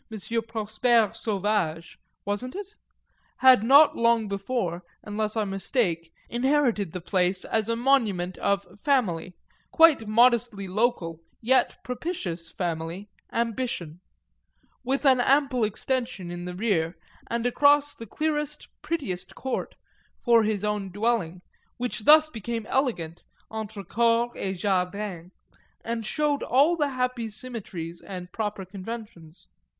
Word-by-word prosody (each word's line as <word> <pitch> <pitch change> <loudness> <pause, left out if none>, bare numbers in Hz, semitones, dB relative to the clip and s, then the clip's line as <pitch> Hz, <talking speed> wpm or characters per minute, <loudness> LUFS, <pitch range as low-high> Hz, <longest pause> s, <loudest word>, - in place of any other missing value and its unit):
Prosper 225 0 +2
Sauvage 200 -7 -2 0.3
wasn't 205 +6 -3
it? 405 0 -7 0.6
had 260 -4 +7
not 280 +6 +7
long 230 -2 +3
before, 195 -3 -2 0.2
unless 210 +1 -2
I 220 - +2
mistake, 195 -4 -1 0.2
inherited 240 - +1
the 180 - -5
place 180 +1 0
as 220 0 -1
a 230 - +1
monument 220 -8 +1
of 200 -1 -1
"family," 185 - 0 0.3
quite 320 -9 +5
modestly 230 -2 +3
local 185 -5 0 0.2
yet 255 +2 +2
propitious 200 - -4
family, 170 +3 -4 0.2
ambition; 230 -8 -2 0.8
with 270 +3 -1
an 260 -2 +6
ample 270 -1 +3
extension 215 -3 -2
in 175 0 -6
the 180 0 -6
rear, 180 -5 0 0.3
and 235 0 -2
across 290 +3 +4
the 230 - -10
clearest 300 +3 -2
prettiest 300 - -4
court, 265 - -4 0.4
for 235 -2 +4
his 210 -2 -1
own 210 -2 -1
dwelling, 200 -4 -1 0.3
which 235 -3 -4
thus 310 +1 +8
became 230 -4 -5
elegant, 175 - -1 0.3
entre 220 -2 -5
cour 235 +4 +2
et 190 - -3
jardin, 185 -1 -2 0.5
and 230 -2 -3
showed 295 +3 0
all 285 +7 +3
the 295 -3 0
happy 250 -3 -2
symmetries 200 -8 -6
and 180 -2 -8
proper 210 -3 -3
conventions. 195 -4 -9
220 Hz, 120 wpm, -26 LUFS, 185-250 Hz, 0.8 s, thus